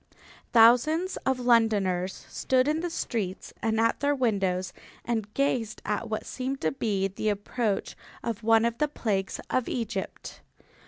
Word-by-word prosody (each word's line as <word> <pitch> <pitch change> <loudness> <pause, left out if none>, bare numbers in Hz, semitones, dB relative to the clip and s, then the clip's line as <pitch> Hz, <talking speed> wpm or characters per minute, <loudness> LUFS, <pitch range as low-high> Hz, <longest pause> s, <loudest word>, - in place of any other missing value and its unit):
Thousands 250 +11 +5
of 265 -1 +2
Londoners 205 -7 +2
stood 255 0 +1
in 305 +1 +1
the 350 +1 -2
streets 210 - -3
and 225 0 +1
at 230 0 +2
their 285 0 +2
windows 195 -8 0 0.3
and 220 -3 -2
gazed 245 -6 0
at 215 +2 -2
what 215 0 -3
seemed 265 +1 -4
to - - +1
be 205 -7 0
the 200 +3 -2
approach 205 +1 -2 0.3
of 230 -2 -3
one 225 0 +4
of 235 0 -1
the 300 - +3
plagues 200 -9 -2
of 255 - 0
Egypt. 225 -5 -4
225 Hz, 150 wpm, -27 LUFS, 205-255 Hz, 0.3 s, Thousands